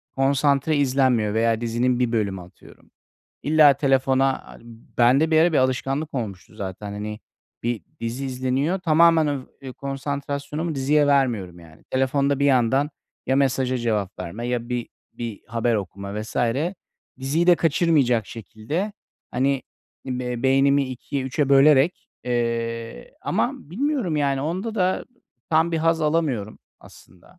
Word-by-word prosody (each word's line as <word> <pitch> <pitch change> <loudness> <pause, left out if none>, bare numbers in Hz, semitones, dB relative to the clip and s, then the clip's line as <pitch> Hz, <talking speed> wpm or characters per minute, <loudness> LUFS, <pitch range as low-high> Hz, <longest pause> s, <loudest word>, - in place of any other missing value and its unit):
konsantre 140 +2 +2
izlenmiyor 130 -6 +2
veya 115 0 +1
dizinin 120 +2 0
1 125 -2 +1
bölümü, 100 -5 -1
atıyorum. 90 0 -17 0.5
İlla 150 -1 +6
telefona, 135 -1 +1
hani, - - -14 0.4
bende 130 +7 +4
bir 160 - +4
ara 170 +1 +4
bir - - +3
alışkanlık 135 +4 -1
olmuştu 100 -7 -5
zaten. 100 +1 -6
Hani, 105 +1 -6 0.4
bir 120 -2 -2 0.2
dizi 115 +4 -3
izleniyor. 130 +7 -1
Tamamen 165 -2 +4 0.4
öv 130 - -6
konsantrasyonumu 140 +4 -4
diziye 145 +2 +2
vermiyorum, 120 -11 +1
yani. 80 -2 -17
Telefonda 140 +1 +1
bir 140 - +1
yandan 135 +2 +3 0.4
ya 130 - +2
mesaja 130 -2 +1
cevap 105 -4 -2
verme 110 +8 -5
ya 120 -1 -2
bir 125 -1 -3 0.2
bir 115 -4 -6
haber 115 0 0
okuma 100 +1 -4
vs. 110 - -9 0.8
Diziyi 145 +6 0
de 175 -1 +7
kaçırmayacak 145 - +2
şekilde 115 - -5 0.4
hani 135 +2 0 0.4
be 125 -2 -3
beynimi 135 +1 +4
2'e 130 +2 -4
3'e 135 +2 -1
bölerek, 140 +3 +4 0.2
eee, 115 - -3
ama - - 0 0.2
bilmiyorum, 250 - -1
yani, 140 -2 +1
onda 185 +10 -3
da 185 -3 0 0.5
tam 165 +1 +3
bir 165 - +1
haz 165 0 +2
alamıyorum 150 -9 -1 0.2
aslında. 90 - -18
135 Hz, 135 wpm, -23 LUFS, 115-150 Hz, 0.8 s, de